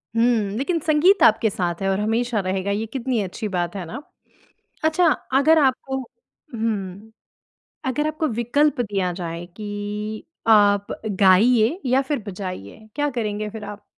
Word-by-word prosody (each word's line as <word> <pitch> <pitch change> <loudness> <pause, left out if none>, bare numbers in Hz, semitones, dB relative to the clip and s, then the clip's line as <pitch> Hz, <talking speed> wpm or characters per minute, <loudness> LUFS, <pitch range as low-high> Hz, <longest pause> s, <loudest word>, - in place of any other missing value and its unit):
हुँ। 230 -3 +2
लेकिन 330 +6 0
संगीत 335 +7 +4
आपके 220 0 +5
साथ 175 -2 -3
है 195 - 0
और 195 +1 0
हमेशा 225 +2 0
रहेगा, 190 +1 -2
ये 215 +2 -1
कितनी 245 -1 -2
अच्छी 195 +3 -5
बात 175 -2 -2
है 185 -3 -4
ना? 170 - -7 0.8
अच्छा, 320 +3 +3 0.3
अगर 315 +3 +5
आपको 265 -1 +1 0.6
हुँ। 215 -1 -3 0.8
अगर 295 +4 0
आपको 310 +1 -1
विकल्प 245 +5 +1
दिया 195 -5 -1
जाए 170 -1 -5
कि 210 +1 -5 0.2
आप 205 -2 +4 0.3
गाइए 220 - +5
या 255 +2 +3
फिर 280 +1 -2
बजाइए, 185 - -7
क्या 290 0 0
करेंगे 215 -3 -3
फिर 215 0 -8
आप? 205 0 -9
215 Hz, 145 wpm, -22 LUFS, 200-260 Hz, 0.8 s, आपके